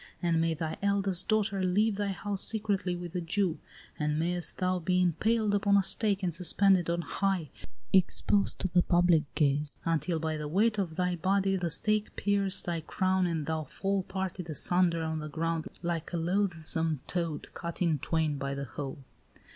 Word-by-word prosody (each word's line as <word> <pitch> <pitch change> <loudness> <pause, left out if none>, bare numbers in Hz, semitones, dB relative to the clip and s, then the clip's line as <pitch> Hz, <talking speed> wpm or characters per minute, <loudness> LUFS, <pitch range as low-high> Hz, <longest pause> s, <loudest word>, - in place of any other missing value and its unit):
And 170 -2 +1
may 165 0 +1
thy 160 0 -4
eldest 195 -2 0
daughter 210 -3 +1
leave 200 +3 +2
thy 205 -1 -1
house 200 0 -3
secretly 205 -5 0
with 175 -1 -7
a 180 - -2
Jew! 175 0 0 0.4
And 150 0 0
mayest 175 +2 -1
thou 185 0 0
be 180 +2 +1
impaled 210 +5 +1
upon 200 0 +3
a 200 - +3
stake, 200 0 +2
and 175 -2 0
suspended 180 +1 +2
on 170 0 0
high, 190 -8 -1 0.4
exposed 195 +2 +2
to - - 0
the 180 0 +3
public 175 -3 +3
gaze, 145 -1 +1
until 165 +1 0
by 160 0 -2
the 150 -1 -4
weight 210 +7 +2
of 170 -5 -2
thy 180 0 0
body 195 +2 +1
the 180 -2 -1
stake 215 +6 +1
pierce 200 -1 +1
thy 170 -2 -2
crown 185 +3 0
and 165 -3 -2
thou 160 0 -2
fall 195 +7 -2
parted 190 -2 -5
asunder 170 +1 +2
on 160 0 -2
the 150 0 -6
ground 165 +1 -2 0.2
like 170 -1 -3
a - - 0
loathsome 165 -4 +2
toad 170 -4 -3
cut 170 -1 -6
in 165 -5 +1
twain 155 -1 0
by 140 0 -3
the 140 0 -4
hoe! 135 +2 -6
175 Hz, 180 wpm, -29 LUFS, 160-195 Hz, 0.4 s, upon